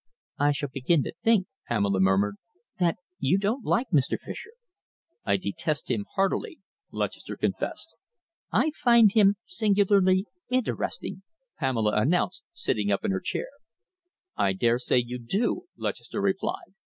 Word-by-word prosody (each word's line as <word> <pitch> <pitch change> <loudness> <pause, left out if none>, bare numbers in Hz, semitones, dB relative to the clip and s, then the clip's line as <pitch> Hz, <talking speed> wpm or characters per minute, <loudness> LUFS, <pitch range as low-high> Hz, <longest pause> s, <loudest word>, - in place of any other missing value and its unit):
"I 145 0 +4
shall 145 0 -2
begin 140 +3 +2
to - - -5
think," 225 -5 +4 0.2
Pamela 100 -4 +1
murmured, 95 +2 +2 0.4
"that 175 -2 +2 0.2
you 140 +8 +2
don't 215 +6 -1
like 240 +2 0
Mr. 140 -5 +2
Fischer!" - - -8 0.8
"I 100 -2 +3
detest 130 - -1
him 105 -4 -1
heartily," 195 0 0 0.3
Lutchester - - -4
confessed. - - -3 0.6
"I 315 - +2
find 235 -7 +5
him 205 -2 +5
singularly 200 - +3 0.2
interesting," 255 -5 -2 0.4
Pamela 115 -7 +1
announced, 170 +10 0
sitting 105 -1 -1
up 100 - 0
in - - +1
her 95 - -1
chair. - - -2 0.9
"I 95 - +2
dare 115 +5 +2
say 125 - +2
you 125 0 -1
do," 220 - -1
Lutchester - - -4
replied. - - -2
145 Hz, 135 wpm, -27 LUFS, -, 0.9 s, find